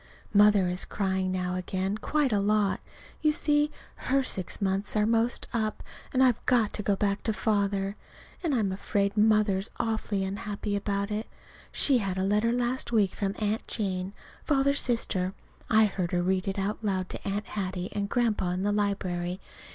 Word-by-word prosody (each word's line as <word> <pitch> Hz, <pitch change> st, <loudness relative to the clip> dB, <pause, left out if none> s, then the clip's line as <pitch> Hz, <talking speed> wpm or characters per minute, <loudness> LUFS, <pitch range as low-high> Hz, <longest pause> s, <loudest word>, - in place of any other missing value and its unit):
Mother 205 Hz, -2 st, +6 dB
is 180 Hz, +1 st, -1 dB
crying 190 Hz, -2 st, -1 dB
now 180 Hz, -1 st, -1 dB
again 185 Hz, +2 st, -2 dB
quite 275 Hz, +3 st, 0 dB
a 205 Hz, -, +3 dB
lot. 205 Hz, 0 st, +2 dB, 0.4 s
You 305 Hz, -, +4 dB
see, 295 Hz, 0 st, +2 dB, 0.4 s
her 270 Hz, +1 st, +3 dB
six 190 Hz, -8 st, -4 dB
months 195 Hz, +1 st, -1 dB
are 210 Hz, 0 st, +3 dB
'most 230 Hz, +2 st, +1 dB
up, 215 Hz, -2 st, -1 dB, 0.3 s
and 260 Hz, 0 st, +3 dB
I've 250 Hz, -4 st, +3 dB
got 235 Hz, -4 st, +3 dB
to -, -, -3 dB
go 200 Hz, 0 st, +1 dB
back 200 Hz, 0 st, 0 dB
to 220 Hz, -, 0 dB
Father. 200 Hz, -2 st, 0 dB, 0.5 s
And 325 Hz, -6 st, 0 dB
I'm 210 Hz, -5 st, +1 dB
afraid 200 Hz, +1 st, 0 dB
Mother 210 Hz, -2 st, +4 dB
is 195 Hz, -, -6 dB
awfully 220 Hz, -3 st, -1 dB
unhappy 205 Hz, +1 st, -3 dB
about 200 Hz, 0 st, -1 dB
it. 215 Hz, +2 st, -2 dB, 0.4 s
She 270 Hz, -4 st, +3 dB
had 195 Hz, -3 st, -2 dB
a 190 Hz, -, 0 dB
letter 210 Hz, +4 st, +2 dB
last 245 Hz, +1 st, -1 dB
week 205 Hz, -5 st, +3 dB
from 200 Hz, 0 st, -2 dB
Aunt 215 Hz, +1 st, -1 dB
Jane, 190 Hz, -2 st, -2 dB, 0.3 s
Father's 280 Hz, -1 st, +2 dB
sister. 195 Hz, -6 st, 0 dB, 0.3 s
I 220 Hz, -1 st, +6 dB
heard 185 Hz, -4 st, -2 dB
her 175 Hz, 0 st, +2 dB
read 190 Hz, +1 st, 0 dB
it 195 Hz, -, -2 dB
out 200 Hz, +2 st, -1 dB
loud 190 Hz, -3 st, 0 dB
to -, -, -6 dB
Aunt 200 Hz, +2 st, -2 dB
Hattie 185 Hz, -2 st, -3 dB
and 200 Hz, -1 st, -2 dB
Grandpa 225 Hz, -6 st, +1 dB
in 180 Hz, +1 st, -1 dB
the 205 Hz, -, +1 dB
library. 185 Hz, -3 st, -1 dB
205 Hz, 180 wpm, -28 LUFS, 190-220 Hz, 0.5 s, Mother